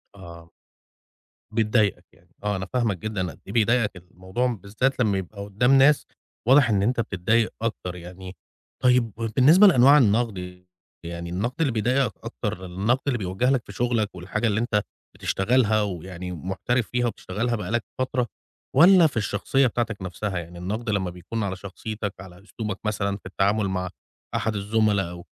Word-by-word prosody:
آه. 85 Hz, -3 st, -12 dB, 1.0 s
بتضايقك 105 Hz, -5 st, +1 dB
يعني. 85 Hz, +3 st, -26 dB
آه، 105 Hz, -1 st, 0 dB
أنا 95 Hz, 0 st, -3 dB
فاهمك 115 Hz, -6 st, +1 dB
جدًا 95 Hz, -3 st, -3 dB
قد -, -, -16 dB
إيه 100 Hz, -, -7 dB
بيضايقك 115 Hz, -3 st, +2 dB
الموضوع، 95 Hz, +8 st, -2 dB
بالذات 120 Hz, +4 st, -1 dB
لمّا 100 Hz, -4 st, +2 dB
يبقى 100 Hz, +2 st, -6 dB
قُدّام 120 Hz, +7 st, +3 dB
ناس 145 Hz, +2 st, +5 dB, 0.4 s
واضح 135 Hz, -1 st, +6 dB
إن 100 Hz, -2 st, +2 dB
أنت 120 Hz, +2 st, +1 dB
بتتضايق 110 Hz, +2 st, +1 dB
أكتر 90 Hz, -6 st, -3 dB
يعني. 90 Hz, +2 st, -10 dB, 0.5 s
طيب، 125 Hz, -4 st, +3 dB
وبالنسبة 135 Hz, -, +6 dB
لأنواع 140 Hz, -3 st, +7 dB
النَقْد، 100 Hz, -7 st, 0 dB, 0.4 s
يعني 85 Hz, 0 st, -6 dB
الْنَقد 105 Hz, +9 st, -2 dB
اللي 140 Hz, -5 st, +2 dB
بيضايقك 125 Hz, +4 st, +1 dB
أكتر، 105 Hz, -5 st, -4 dB
النَقْد 100 Hz, +9 st, 0 dB
اللي 125 Hz, -4 st, +1 dB
بيُوَجّه 95 Hz, +6 st, 0 dB
لك 135 Hz, -4 st, +2 dB
في -, -, -10 dB
شُغلك 115 Hz, -5 st, 0 dB
والحاجة 100 Hz, +6 st, -2 dB
اللي 110 Hz, 0 st, +1 dB
أنت 110 Hz, -3 st, +1 dB, 0.3 s
بتشتغلها 110 Hz, +1 st, +2 dB
ويعني 90 Hz, -2 st, -5 dB
محترف 95 Hz, -, -2 dB
فيها 120 Hz, 0 st, 0 dB
وبتشتغلها 115 Hz, +2 st, -2 dB
بقى 105 Hz, -1 st, -5 dB
لك 120 Hz, -1 st, +1 dB, 0.2 s
فترة 130 Hz, -2 st, 0 dB, 0.5 s
والّا 170 Hz, +3 st, +7 dB
في 125 Hz, -, -6 dB
الشخصية 110 Hz, +6 st, +1 dB
بتاعتك 115 Hz, -2 st, -2 dB
نَفْسها؟ 95 Hz, +1 st, -4 dB
يعني 85 Hz, +1 st, -9 dB
النَقْد 105 Hz, +6 st, -4 dB
لمّا 95 Hz, -3 st, 0 dB
بيكون 95 Hz, +6 st, -5 dB
على 95 Hz, -1 st, -2 dB
شخصيتك، 100 Hz, +2 st, -6 dB
على 95 Hz, 0 st, -12 dB
أسلوبك 105 Hz, -2 st, -5 dB
مثلًا 100 Hz, -1 st, -1 dB
في -, -, -25 dB
التعامل 100 Hz, +2 st, +1 dB
مع 90 Hz, -1 st, -2 dB, 0.5 s
أحد 110 Hz, -1 st, -1 dB
الزُملا 105 Hz, -2 st, +1 dB
أو 85 Hz, 0 st, -10 dB
105 Hz, 160 wpm, -24 LUFS, 95-120 Hz, 1.0 s, لأنواع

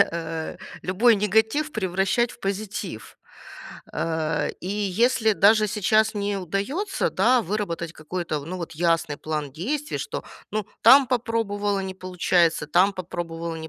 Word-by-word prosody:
э, 165 Hz, -4 st, -1 dB, 0.3 s
любой 215 Hz, +5 st, +4 dB
негатив 220 Hz, +9 st, +1 dB
превращать 195 Hz, +4 st, 0 dB
в -, -, -13 dB
позитив, 195 Hz, -, -5 dB, 0.8 s
э, 160 Hz, -2 st, -1 dB
и 180 Hz, -, -6 dB, 0.3 s
если 235 Hz, -3 st, +4 dB
даже 215 Hz, +2 st, +5 dB
сейчас 215 Hz, +2 st, +2 dB
не 205 Hz, -1 st, -1 dB
удается, 200 Hz, -, -2 dB
да, 250 Hz, -1 st, +3 dB
выработать 170 Hz, -4 st, -3 dB
какой-то 155 Hz, -1 st, -4 dB
в 140 Hz, -, -11 dB
ну, 185 Hz, +3 st, -5 dB
вот 170 Hz, -, -6 dB
ясный 165 Hz, -3 st, +1 dB
план 150 Hz, -2 st, -3 dB
действий, 280 Hz, -, -3 dB
что, -, -, -4 dB, 0.3 s
ну, 215 Hz, -1 st, -1 dB, 0.2 s
там 275 Hz, 0 st, +8 dB
попробовала- 210 Hz, -5 st, 0 dB
не 190 Hz, 0 st, -5 dB
получается, 180 Hz, -3 st, +1 dB
там 185 Hz, +6 st, +4 dB
попробовала- 170 Hz, -2 st, -5 dB
не 160 Hz, 0 st, -7 dB
195 Hz, 135 wpm, -24 LUFS, 165-220 Hz, 0.8 s, там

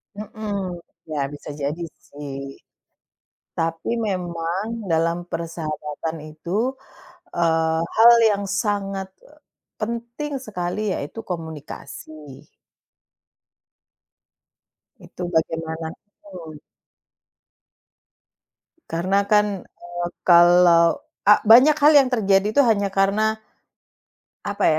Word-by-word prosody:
Mhm. 205 Hz, -4 st, -5 dB, 0.3 s
Ya, 150 Hz, -2 st, -3 dB
bisa 145 Hz, -, -10 dB
jadi, 150 Hz, +5 st, -3 dB, 0.3 s
sih. 145 Hz, -1 st, -8 dB, 1.2 s
Tapi, 165 Hz, 0 st, -2 dB, 0.2 s
memang 175 Hz, 0 st, -3 dB, 0.3 s
dalam 165 Hz, +1 st, +2 dB
persahabatan 160 Hz, -1 st, -5 dB
itu, 205 Hz, +12 st, -2 dB, 0.6 s
eee, 160 Hz, -1 st, +1 dB, 0.2 s
hal 230 Hz, +2 st, +8 dB, 0.2 s
yang 200 Hz, -1 st, -1 dB
sangat, 200 Hz, -1 st, -2 dB
eee, 300 Hz, +1 st, -21 dB, 0.4 s
penting 235 Hz, +6 st, -4 dB
sekali 180 Hz, -2 st, -4 dB, 0.2 s
yaitu 145 Hz, +10 st, -6 dB
komunikasi. 160 Hz, -3 st, -8 dB, 2.9 s
Itu -, -, -12 dB
bagaimana 160 Hz, 0 st, -2 dB
betul. 185 Hz, -6 st, -13 dB, 2.3 s
Karena 185 Hz, +4 st, +1 dB
kan, 210 Hz, -2 st, +2 dB
eee, 175 Hz, 0 st, -7 dB, 0.2 s
kalau 175 Hz, -1 st, +6 dB, 0.2 s
a 210 Hz, +1 st, +6 dB
banyak 255 Hz, +7 st, +8 dB
hal 295 Hz, +1 st, +6 dB
yang 270 Hz, -3 st, +6 dB
terjadi 200 Hz, -4 st, +2 dB
tuh 285 Hz, -, +6 dB
hanya 200 Hz, -3 st, +1 dB
karena, 210 Hz, +3 st, +1 dB, 1.0 s
apa 205 Hz, 0 st, -2 dB
180 Hz, 85 wpm, -22 LUFS, 165-210 Hz, 2.9 s, hal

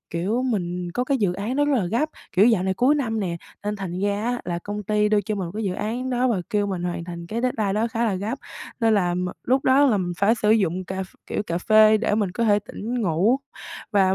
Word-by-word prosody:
kiểu, 200 Hz, +9 st, -1 dB
mình 180 Hz, -7 st, -2 dB
có 250 Hz, -, 0 dB
cái 275 Hz, 0 st, 0 dB
dự 195 Hz, -4 st, +1 dB
án 210 Hz, +8 st, -3 dB
đó 290 Hz, -, +3 dB
rất 290 Hz, -1 st, +2 dB
là 190 Hz, -, 0 dB
gấp, 240 Hz, -, 0 dB, 0.2 s
kiểu 200 Hz, +5 st, +5 dB
dạo 220 Hz, -6 st, +3 dB
này 190 Hz, 0 st, 0 dB
cuối 260 Hz, +8 st, +3 dB
năm 225 Hz, -6 st, -1 dB
nè, 175 Hz, -3 st, -2 dB, 0.3 s
nên 210 Hz, 0 st, -2 dB
thành 185 Hz, -2 st, -5 dB
ra 205 Hz, +2 st, 0 dB
á 245 Hz, 0 st, -1 dB
là 175 Hz, -1 st, -2 dB
công 205 Hz, +3 st, -5 dB
ty 210 Hz, +1 st, +1 dB
đưa 210 Hz, -1 st, +3 dB
cho 210 Hz, +2 st, -3 dB
mình 190 Hz, -3 st, -3 dB
một 170 Hz, -, -8 dB
cái 220 Hz, 0 st, -3 dB
dự 185 Hz, -, 0 dB
án 245 Hz, +6 st, -3 dB
đó, 250 Hz, +1 st, +1 dB
và 205 Hz, -6 st, +1 dB
kêu 205 Hz, -2 st, +1 dB
mình 190 Hz, -3 st, -3 dB
hoàn 175 Hz, -1 st, -3 dB
thành 170 Hz, -1 st, -7 dB
cái 225 Hz, +6 st, -3 dB
deadline 220 Hz, -6 st, 0 dB
đó 220 Hz, +3 st, +1 dB
khá 230 Hz, +1 st, -1 dB
là 215 Hz, -, +1 dB
gấp, 215 Hz, +8 st, -3 dB, 0.4 s
nên 225 Hz, -1 st, +4 dB
là 180 Hz, -3 st, +1 dB
m 180 Hz, 0 st, -1 dB, 0.2 s
lúc 260 Hz, +2 st, +2 dB
đó 270 Hz, +2 st, +5 dB
là 230 Hz, -, +3 dB
mình 180 Hz, -2 st, -2 dB
phải 210 Hz, +4 st, +4 dB
sử 210 Hz, -2 st, +1 dB
dụng 185 Hz, -4 st, +2 dB
cà 190 Hz, +1 st, -4 dB
ph 185 Hz, -, -12 dB
kiểu, -, -, -2 dB
cà 170 Hz, -4 st, -2 dB
phê 215 Hz, +2 st, +6 dB
để 215 Hz, -1 st, 0 dB
mình 205 Hz, -4 st, 0 dB
có 235 Hz, +5 st, -1 dB
thể 205 Hz, -2 st, +4 dB
tỉnh 230 Hz, +4 st, -5 dB
ngủ 190 Hz, +8 st, +2 dB, 0.6 s
và 190 Hz, -2 st, +4 dB
210 Hz, 270 wpm, -23 LUFS, 185-230 Hz, 0.6 s, phê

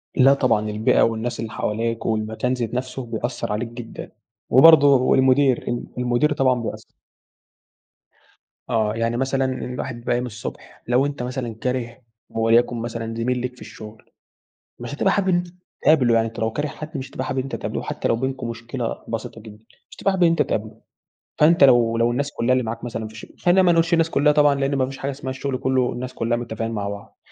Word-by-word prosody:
لا 135 Hz, +1 st, +6 dB
طبعًا 115 Hz, -6 st, +1 dB
البيئة 105 Hz, +1 st, +2 dB
والناس 115 Hz, +1 st, 0 dB
اللي 115 Hz, -1 st, -4 dB
حواليك 115 Hz, +1 st, -2 dB
والمكان 110 Hz, +3 st, -1 dB
ذات 120 Hz, -2 st, -3 dB
نفسه 130 Hz, +1 st, -4 dB
بيأثر 120 Hz, +1 st, -4 dB
عليك 110 Hz, +3 st, -2 dB
جدًا، 120 Hz, 0 st, -9 dB, 0.4 s
وبرضه 145 Hz, +2 st, +8 dB
والمدير 130 Hz, 0 st, +4 dB
ال 120 Hz, 0 st, -2 dB
المدير 125 Hz, +4 st, +1 dB
طبعًا 130 Hz, -4 st, +2 dB
بيأثر. -, -, -7 dB, 1.8 s
اه 110 Hz, -3 st, +1 dB
يعني 115 Hz, +1 st, -1 dB
مثلًا 135 Hz, +1 st, 0 dB, 0.2 s
الواحد 125 Hz, 0 st, -5 dB
بيبقي 120 Hz, 0 st, -4 dB
قايم 120 Hz, +1 st, -1 dB
الصبح 115 Hz, -1 st, -9 dB
لو 125 Hz, +3 st, +3 dB
أنتَ 145 Hz, -3 st, -4 dB
مثلًا 125 Hz, -2 st, -4 dB
كاره 120 Hz, 0 st, -3 dB, 0.3 s
وليكن 115 Hz, +2 st, +2 dB
مثلًا 115 Hz, -1 st, -4 dB
زميل 125 Hz, +2 st, -1 dB
ليك 125 Hz, 0 st, -4 dB
في -, -, -19 dB
الشغل، 110 Hz, 0 st, -11 dB, 0.7 s
مش 120 Hz, +3 st, -6 dB
هتبقى 190 Hz, +6 st, +1 dB
حابب 195 Hz, -2 st, +1 dB
أن 180 Hz, -, +3 dB
أنتَ 175 Hz, 0 st, -2 dB, 0.3 s
تقابله 130 Hz, -7 st, +4 dB
يعني 115 Hz, 0 st, +2 dB
أنتَ 115 Hz, -, -9 dB
لو 110 Hz, 0 st, 0 dB
كاره 145 Hz, +6 st, -2 dB
حد 155 Hz, +1 st, -7 dB
مش 130 Hz, 0 st, -7 dB
هتبقى 130 Hz, -, -4 dB
حابب 130 Hz, -, -3 dB
إن -, -, -1 dB
أنتَ 135 Hz, -, -5 dB
تقابله، -, -, -4 dB
وحتى -, -, -3 dB
لو -, -, +2 dB
بينكم 130 Hz, 0 st, -3 dB
مشكلة 115 Hz, +1 st, -4 dB
بسيطة 115 Hz, 0 st, -5 dB
جدًا، 110 Hz, 0 st, -14 dB, 0.2 s
مش -, -, -14 dB
هتبقى 195 Hz, -, +1 dB
حابب 185 Hz, -2 st, +1 dB
إن 170 Hz, -, +6 dB
أنتَ 165 Hz, -1 st, +2 dB
تقابله، 110 Hz, +1 st, -3 dB, 0.6 s
فأنتَ 155 Hz, 0 st, +5 dB
لو 120 Hz, -4 st, +5 dB
لو 115 Hz, +1 st, +2 dB
الناس 140 Hz, +3 st, -2 dB
كلها 125 Hz, -2 st, +1 dB
اللي 130 Hz, 0 st, +1 dB
معاك 115 Hz, +1 st, -5 dB
مثلًا 115 Hz, -2 st, -4 dB
في 110 Hz, -, -13 dB
الشغ 110 Hz, -, -10 dB
خلينا 180 Hz, +2 st, +4 dB
ما 180 Hz, -, +4 dB
نقولش 165 Hz, 0 st, +2 dB
الناس 165 Hz, -1 st, +3 dB
كلها 150 Hz, -1 st, +3 dB
طبعًا 145 Hz, -1 st, +4 dB
لأن 135 Hz, 0 st, 0 dB
ما 130 Hz, -1 st, +2 dB
فيش 135 Hz, +1 st, -8 dB
حاجة 140 Hz, +1 st, -3 dB
اسمها 135 Hz, -1 st, -7 dB
الشغل 135 Hz, 0 st, -3 dB
كله 130 Hz, -1 st, +1 dB
الناس 130 Hz, +1 st, -6 dB
كلها 120 Hz, -1 st, -1 dB
متفقين 115 Hz, -1 st, -4 dB
مع 100 Hz, -3 st, -3 dB
بعض، 100 Hz, 0 st, -9 dB
125 Hz, 200 wpm, -22 LUFS, 115-135 Hz, 1.8 s, وبرضه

